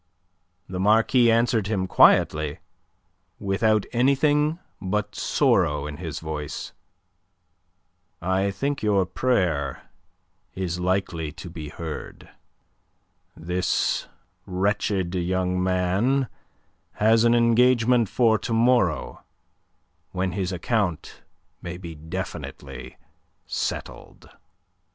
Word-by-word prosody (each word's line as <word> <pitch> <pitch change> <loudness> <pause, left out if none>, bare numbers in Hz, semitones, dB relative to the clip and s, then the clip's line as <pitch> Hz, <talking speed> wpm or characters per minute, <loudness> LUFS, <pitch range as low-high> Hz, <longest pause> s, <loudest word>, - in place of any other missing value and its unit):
The 90 -1 -5
Marquis 115 +4 +4
answered 115 -2 +2
him 100 -3 -1
quietly, 75 -4 +4 0.8
without 105 +2 +1
anything 145 +5 +2 0.2
but 105 +2 -2
sorrow 75 0 +1
in 75 -1 -6
his - - -5
voice. 75 -3 -5 1.5
"I 95 +2 0
think 140 +8 -2
your 100 -3 +2
prayer 85 - -1 0.6
is 90 -2 -3
likely 90 -4 -1
to 90 0 -9
be 80 -3 -7
heard. 80 0 -7 1.1
This 90 +2 -1 0.4
wretched 95 -1 0
young 90 0 0
man 95 +9 +1 0.7
has 110 +1 +3
an 120 0 +4
engagement 120 -1 +4
for 115 -3 +3
to 115 - -3
morrow, 115 - +2 0.9
when 90 0 -1
his 95 0 -2
account 90 -1 -2 0.4
may 85 0 -6
be 85 -2 -8
definitely 80 +1 -7 0.5
settled." - - -5
95 Hz, 90 wpm, -24 LUFS, 90-115 Hz, 1.5 s, Marquis